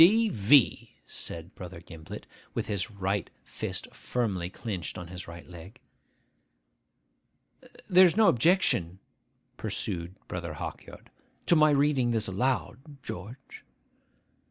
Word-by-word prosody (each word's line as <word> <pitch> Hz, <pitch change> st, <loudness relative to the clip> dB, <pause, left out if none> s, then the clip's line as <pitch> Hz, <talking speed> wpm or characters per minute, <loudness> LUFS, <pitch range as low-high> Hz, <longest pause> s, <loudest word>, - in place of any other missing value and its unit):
'D.V.!' 165 Hz, -, +5 dB
said 85 Hz, +2 st, -5 dB
Brother 90 Hz, -1 st, -8 dB
Gimblet, 80 Hz, -2 st, -10 dB, 0.3 s
with -, -, -1 dB
his 100 Hz, -1 st, -2 dB
right 100 Hz, -2 st, -2 dB
fist -, -, -5 dB
firmly 100 Hz, -8 st, -2 dB
clinched 95 Hz, -4 st, -5 dB
on 90 Hz, -1 st, -7 dB
his 90 Hz, 0 st, -8 dB
right 85 Hz, 0 st, -10 dB
leg. 90 Hz, +3 st, -12 dB, 2.1 s
'There 185 Hz, 0 st, +8 dB
is 175 Hz, -, -1 dB
no 220 Hz, -2 st, +6 dB
objection,' 120 Hz, -, +3 dB, 0.6 s
pursued 85 Hz, +1 st, -3 dB
Brother -, -, -4 dB
Hawkyard, -, -, -8 dB, 0.3 s
'to 175 Hz, -, +5 dB
my 155 Hz, -1 st, +6 dB
reading 140 Hz, -3 st, +3 dB
this 110 Hz, -2 st, +1 dB
aloud, 125 Hz, +5 st, 0 dB, 0.2 s
George? 115 Hz, +9 st, -8 dB
105 Hz, 110 wpm, -29 LUFS, 90-140 Hz, 2.1 s, There